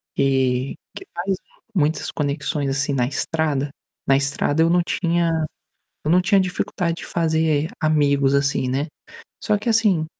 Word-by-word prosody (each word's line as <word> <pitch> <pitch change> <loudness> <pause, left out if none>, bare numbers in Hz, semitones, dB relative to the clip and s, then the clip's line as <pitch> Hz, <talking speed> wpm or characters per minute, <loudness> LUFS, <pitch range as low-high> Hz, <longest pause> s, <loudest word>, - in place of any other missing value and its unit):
que 130 -1 +1 0.2
que - - -8
faz 185 +3 -1 0.4
muitas 155 -1 +1
conexões 145 -1 -2
assim, 145 +1 0
na 125 -2 +2
estrada. 145 +1 -1 0.4
Na 135 - +5
estrada 145 +2 +1
eu 165 - +3
não 175 +1 +4
tinha 170 -1 +1 0.8
eu 155 - +2
não 180 +1 +5
tinha 195 +2 +4
dificuldade 180 -2 -1
de - - -7
fazer 160 -2 +1
amigos 140 -3 +3
assim, 140 -2 +1
né, 140 +4 -1 0.6
só 210 -1 +2
que 210 - -4
assim 210 -8 +3
155 Hz, 145 wpm, -22 LUFS, 140-170 Hz, 0.8 s, Na